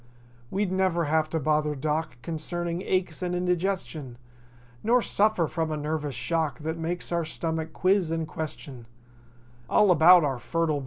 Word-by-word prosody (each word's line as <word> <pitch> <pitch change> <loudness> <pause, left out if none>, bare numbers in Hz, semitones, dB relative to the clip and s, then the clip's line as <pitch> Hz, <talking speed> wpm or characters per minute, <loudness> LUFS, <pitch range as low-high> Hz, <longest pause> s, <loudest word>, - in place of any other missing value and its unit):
We'd 195 -1 -1
never 185 -2 +1
have 155 0 +1
to 160 - -1
bother 150 0 +1
Doc 150 -1 -2
Concerning 170 +1 -3
aches 185 -4 -1
and 180 -1 -1
indigestion; 180 -7 -2 0.7
Nor 240 +2 +3
suffer 205 -4 +2
from 160 +1 -2
a 155 - -2
nervous 150 -2 -3
shock 150 +1 -1
That 160 +2 -2
makes 175 +2 -3
our 170 -1 +1
stomach 160 0 -3
quiz 185 +1 +2
and 165 -1 -2
question 125 -6 -7 0.8
All 205 -3 +5
about 175 +1 +7
our 135 -4 -1
fertile 155 +5 0
160 Hz, 150 wpm, -27 LUFS, 150-180 Hz, 0.8 s, about